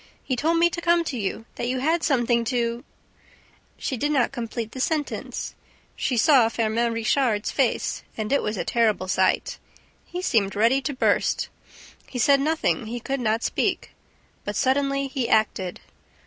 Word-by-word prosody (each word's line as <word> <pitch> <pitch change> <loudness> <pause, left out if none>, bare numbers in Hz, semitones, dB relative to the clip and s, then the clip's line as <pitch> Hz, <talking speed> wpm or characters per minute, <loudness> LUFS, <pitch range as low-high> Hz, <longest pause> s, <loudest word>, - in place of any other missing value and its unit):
He 260 - -1
told 320 +6 +1
me 340 +1 +5
to 340 - -4
come 340 0 +3
to 295 - -4
you, 220 0 -3
that 240 - -2
you 255 +1 -1
had 320 +5 +1
something 240 -5 +2
to 235 0 -1 0.5
..." - - -30 0.2
She 260 - -3
did 290 +6 0
not 265 -5 +2
complete 230 -3 -5
the 260 - -8
sentence. 300 +2 -2 0.4
She 250 - -1
saw 255 -3 +5
Firmin 230 +1 0
Richard's 230 -1 +1
face; - - 0 0.2
and 215 +3 -2
it 280 - +3
was 210 0 -2
a - - -2
terrible 220 -5 +1
sight. 185 0 +1 0.4
He 360 +1 -6
seemed 210 - +1
ready 230 +6 +3
to 285 - -3
burst. - - +1 0.6
He 255 - -7
said 275 +3 +4
nothing, 305 -6 0
he 240 +2 -4
could 270 +3 -3
not 225 -1 0
speak. - - -1 0.5
But - - -4
suddenly 275 +1 +1
he 265 -3 -2
acted. 200 -4 +1
245 Hz, 170 wpm, -24 LUFS, 225-280 Hz, 0.6 s, me